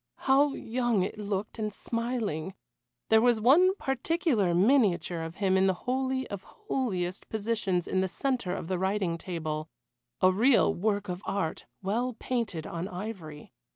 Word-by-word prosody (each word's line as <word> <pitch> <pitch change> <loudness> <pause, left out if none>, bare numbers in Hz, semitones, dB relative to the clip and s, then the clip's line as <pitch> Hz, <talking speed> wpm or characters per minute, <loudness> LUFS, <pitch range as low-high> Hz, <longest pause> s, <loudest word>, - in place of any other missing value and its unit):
How 275 +1 +4
young 235 -4 0
it 205 +3 -4
looked 205 +1 -3
and 215 -1 -1
smiling! 220 -7 -3 0.5
There 220 0 +6
was 240 -1 +4
one 340 - +5
particular 270 - 0
miniature 185 - +3
of 165 +1 -6
him 190 -1 +1
in 190 0 +4
the 190 - +2
holy 260 +1 0
of 200 -2 -4
holiest 220 - -3
positions 210 -5 -1
in 185 - +1
the 190 - +1
centre 240 -2 -1
of - - -5
the 185 0 -1
writing 190 -3 0
table 155 -4 -4 0.5
a 185 - +5
real 230 +7 +4
work 205 +1 -1
of 180 0 -4
art, 195 -5 -3 0.2
well 235 +6 -1
painted 220 -12 -2
on 170 +2 -4
ivory. 180 -6 -7
205 Hz, 155 wpm, -29 LUFS, 180-245 Hz, 0.5 s, There